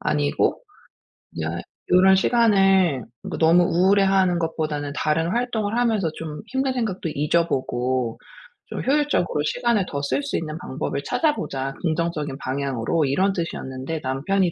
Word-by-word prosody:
아니고 75 -1 0 0.8
여 80 - -2 0.4
요런 190 +1 +6
시간을 195 - +3 0.3
뭐 - - -4
너무 170 +2 +5
우울해 190 +4 +3
하는 190 -2 +3
것보다는 155 -3 -2
"다른 160 +3 0
활동을 230 -2 -1
하면서 220 -8 +1
좀 155 0 -6
힘든 265 0 -1
생각도 215 -8 -2
잊어보고 130 -6 0 0.5
좀 - - -5
효율적으로 280 - +1
시간을 215 +3 +1
더 140 - -3
쓸 140 +1 0
수 140 - -3
있는 155 -1 -4
방법을 140 -2 -4
찾아보자, 135 - -1
긍정적인 155 -4 -1
방향으로." 140 +2 -1
이런 190 +9 +1
뜻이었는데 155 -3 -4
남편이 170 +8 0
165 Hz, 325 characters per minute, -23 LUFS, 140-195 Hz, 0.8 s, 요런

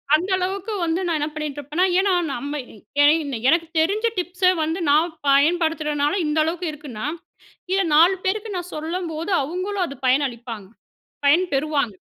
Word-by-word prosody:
அந்த 355 +5 -1
அளவுக்கு 385 +3 -3
வந்து 335 +2 0
நான் 335 -2 +1
என்ன 295 - -1
பண்ணிட்டுருப்பேன்னா 300 +2 -2
ஏன்னா, 390 0 +2 0.2
நம்ம 285 +4 -4 0.4
என 290 - +7 0.4
எனக்கு 335 +1 +2
தெரிஞ்ச 400 +8 +1
டிப்ஸ 360 +1 +1
வந்து 320 +4 -2
நான் 320 +4 +3 0.2
பயன்படுத்துறனால 300 0 +2
இந்த 300 +1 -1
அளவுக்கு 340 +2 -2
இருக்குன்னா, 285 -7 -7 0.7
இத 390 - +3
4 340 +5 +6
பேருக்கு 420 +3 -1
நான் 355 0 -6
சொல்லும்போது, 325 +2 -4
அவுங்களும் 365 +6 -2
அது 280 - -8
பயனளிப்பாங்க. 240 -6 -1 0.6
பயன் 330 +6 +5
பெறுவாங்க. 280 -5 0
320 Hz, 140 wpm, -22 LUFS, 290-360 Hz, 0.7 s, என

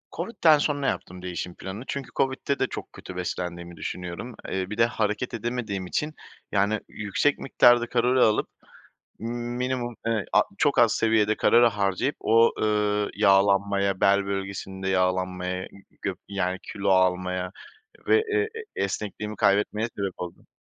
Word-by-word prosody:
COVID'den 170 -9 +3
sonra 145 -2 0
yaptım 90 -2 -3
değişim 90 -1 -5
planını 100 +6 -7
çünkü 140 -2 -4
COVID'de 135 +1 0
de 130 - +2
çok - - -7
kötü 90 - -10
beslendiğimi 85 -1 -4
düşünüyorum. 90 +7 -6
Eee, 95 0 -2
bir 105 - -5
de 115 - +5
hareket 110 +1 -1
edemediğim 115 -4 -3
için, 150 +9 -2 0.4
yani, 100 +2 +2
yüksek 105 +8 0
miktarda 120 -2 +4
kalori 125 +2 +2
alıp, 110 -1 +3 0.7
minimum, 120 +1 -3
eee, 110 -3 0
a - - +6 0.2
çok - - +2
az - - +6
seviyede 110 -1 +2
kalori 120 +1 +5
harcayıp 105 +4 0
o, 115 +1 +5
ııı, 105 -1 +1
yağlanmaya, 100 -1 +3
bel 100 0 +4
bölgesinde 95 -1 -4
yağlanmaya, 90 0 0 0.4
gö - - -1
yani, 95 -2 -1
kilo 100 - -2
almaya 90 0 +2 0.6
ve, 435 +1 +5
ııı, 430 - +3 0.3
e - - 0
esnekliğimi 105 +1 -3
kaybetmeye 105 +3 +2
sebep 100 -2 -2
oldu. 90 -1 -8
105 Hz, 140 wpm, -26 LUFS, 95-120 Hz, 0.7 s, a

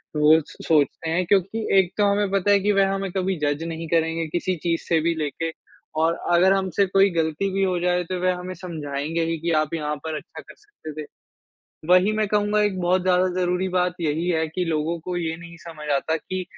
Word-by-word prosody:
वो 150 +1 +6
स - - -15
सोचते 160 +1 +2
हैं, 175 +3 0
क्योंकि 200 +4 +1
एक 185 -2 +2
तो 205 - +3
हमें 205 0 +1
पता 195 0 +2
है 200 - +5
कि 205 +2 +2
वह 195 -1 +3
हमें 195 -1 -3
कभी 190 +1 -1
जज 145 +1 -1
नहीं 165 0 -5
करेंगे 165 0 +1
किसी 175 +3 -1
चीज़ 165 -1 0
से 165 - +3
भी 170 +1 +1
लेके 160 +1 -3 0.5
और 165 +1 +3 0.2
अगर 185 +3 +5
हमसे 195 +1 +1
कोई 195 +1 +4
गलती 165 +3 0
भी 195 0 +1
हो 185 -2 +1
जाए, 180 0 +1
तो 180 +1 -4
वह 185 0 +2
हमें 180 +1 -6
समझाएँगे 160 -2 -3
ही 165 0 -1
कि, 170 +2 -2
"आप 155 -1 +1
यहाँ 150 -2 -2
पर 160 -1 -3
अच्छा - - -10
कर - - -15
सकते 415 - -12
थे।" - - -7 0.9
वही 185 +3 +5
मैं 215 -1 +1
कहूँगा, 210 0 +1
एक 205 -3 0
बहुत 180 +1 +2
ज़्यादा 185 0 +3
ज़रूरी 180 +1 0
बात 180 -1 0
यही 160 +2 -1
है 160 -2 +1
कि 180 +4 -2
लोगों 165 +1 -1
को 180 -1 -3
ये 165 -2 -2
नहीं 170 0 -12
समझ 155 -2 -8
आता 160 +3 -1
कि 185 +3 -5
175 Hz, 220 wpm, -23 LUFS, 160-190 Hz, 0.9 s, वो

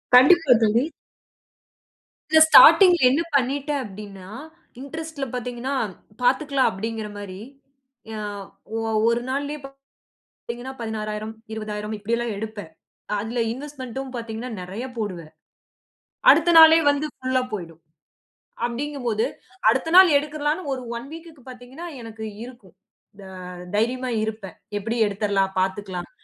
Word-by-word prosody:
கண்டிப்பா, 280 +2 +7
தோழி. 225 +4 +3 1.5
இந்த 315 - +7
ஸ்டார்ட்டிங்ல 355 +2 +8
என்ன 285 +6 +2
பண்ணிட்டேன்? 280 +2 0
அப்படின்னா, 195 -2 -10 0.5
இன்ட்ரெஸ்ட்ல 315 0 -6
பாத்தீங்கன்னா 250 +2 -4 0.5
பாத்துக்கலாம் 270 +2 +2
அப்பிடீங்கிற 220 +2 -5
மாரி, 195 -2 -8 0.7
எ - - -5 0.9
ஒ-1 235 +1 +2
நாளிலயே 285 +3 -3 0.7
பார்த்தீங்கன்னா, 240 +3 -8
16,000, 215 -1 -4 0.2
20,000 215 -1 -5
இப்படி 205 +3 -2
எல்லாம் 235 -3 -3
எடுப்பேன். 210 -5 -7 0.5
அதில 225 +4 -3
இன்வெஸ்ட்மென்டும் 265 -1 -7
பாத்தீங்கன்னா, 230 +1 -6
நெறைய 195 +7 -6
போடுவேன். 180 -7 -5 1.0
அடுத்த 340 -5 +5
நாளே 320 0 +9
வந்து 285 +1 -1
புல்லா 255 0 0
போய்டும். 165 -5 -7 0.8
அப்பிடீங்கும்போது, 240 -3 -2 0.4
அடுத்த 325 - -1
நாள் 370 -5 +8
எடுத்துறலாம்ன்னு 300 +2 -3
ஒரு 255 - -7 0.2
1 240 - -10
வீக்க்கு 325 -4 -12
பாத்தீங்கன்னா, 255 +7 -10 0.2
எனக்கு 225 -1 -8 0.2
இருக்கும். 235 -8 -14 0.4
த - - -13 0.5
தைரியமா 250 +4 0
இருப்பேன். 215 -4 -6 0.2
எப்பிடியும் 225 +2 0
எடுத்துறலாம், 200 -1 0
பாத்துக்கலாம் 190 -1 -3
240 Hz, 105 wpm, -23 LUFS, 210-280 Hz, 1.5 s, நாளே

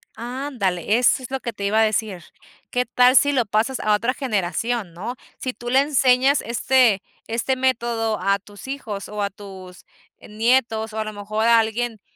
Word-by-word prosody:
Ándale. 230 - -2
Eso 250 +1 +3
es 255 - -8
lo 265 - -2
que 235 -2 -5
te 200 -1 -5
iba 215 +2 +2
a - - +5
decir, 215 -4 -1 0.5
qué 250 0 0
tal 250 +1 +4
si 285 +2 +5
lo 255 -4 +1
pasas 220 +6 0
a 215 - +1
otra 230 +4 +1
generación, 220 - -2
¿no? 210 +9 -5 0.2
Si 255 - -4
tú 240 0 -7
le 260 +2 +4
enseñas 270 -1 +3
este 235 -3 +2 0.3
este 235 +3 -1
método 235 -4 0
a 195 +2 +1
tus 205 +3 -13
hijos 225 -8 -5
o 210 0 -5
a 200 - 0
tus 190 -2 -12 0.3
nietos 225 0 0
o 220 - -5
a - - 0
lo 215 - -6
mejor 210 +2 -2
a 230 0 +6
alguien 225 0 -2
225 Hz, 190 wpm, -22 LUFS, 210-250 Hz, 0.5 s, a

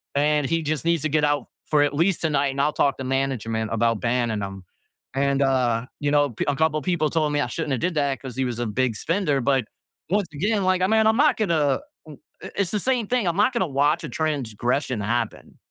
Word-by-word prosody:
and 150 0 +2
he 165 0 0
just 155 -1 -2
needs 170 -2 +2
to 155 - 0
get 150 0 +1
out 145 -2 0 0.2
for 150 -1 +3
at 145 0 0
least 170 +4 +1
tonight, 145 -3 +1
and 140 +1 -1
I'll 150 +1 +1
talk 140 - +1
to - - -3
management 120 -5 -1
about 115 -1 +1
banning 120 -3 0
him." 95 -1 -6 0.5
And, 140 0 +1
uh, 125 -3 +1 0.2
you 145 0 0
know, 145 -2 +3
pe 110 - -3
a 145 - +1
couple 155 0 +1
people 155 -2 +1
told 155 -2 0
me 145 - +1
I - - 0
shouldn't 160 -3 -4
have 125 - -1
did 180 -1 -1
that 140 -2 +1
because 130 -3 -8
he 135 - +1
was 120 -2 -3
a 120 - -1
big 120 +2 0
spender. 165 -4 0
But, 135 0 +2 0.5
once 200 0 +1
again, 200 +7 0
like, 185 -1 +2
I 185 - +3
mean, 220 +1 +3
I'm 220 - +4
not 300 +2 +4
gonna 160 -9 +1 0.3
i 155 - -10 0.3
i - - -6
it's 195 -3 0
the 210 - 0
same 250 -4 0
thing. 245 -2 0
I'm 170 +2 0
not 215 +5 +3
gonna 235 -7 0
watch 150 +1 +2
a - - -6
transgression 130 -4 -1
happen. 120 +4 -3
145 Hz, 235 wpm, -24 LUFS, 130-165 Hz, 0.5 s, I'm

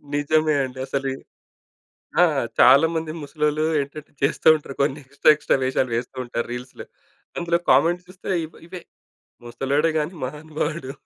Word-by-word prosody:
నిజమే 155 +1 +2
అండి. 130 0 -7
అసలి. 135 0 -2 1.1
ఆ! - - +8 0.4
చాలా 135 +5 +7
మంది 160 -1 -2
ముసలోళ్ళు 150 +1 -1 0.2
ఏంటంటే, 140 +2 -9
చేస్తా 135 - +1
ఉంటారు 145 -3 -7
కొన్ని 140 +1 0
ఎక్స్‌ట్రా, 140 +3 +4
ఎక్స్‌ట్రా 150 - +1
వేషాలు 130 -1 0
వేస్తూ 120 +3 -4
ఉంటారు 120 -1 -3
రీల్స్‌లో. 125 +1 -8 0.5
అందులో 170 0 0
కామెంట్స్ 170 +7 +3
చూస్తే 185 0 -13 0.2
ఇవ్ 160 - -16
ఇవే. 180 0 -8 0.6
ముసలోడే 140 +6 0
గాని 155 +4 -3
మహానుభావుడు. 150 +1 -4
145 Hz, 135 wpm, -23 LUFS, 135-155 Hz, 1.1 s, ఆ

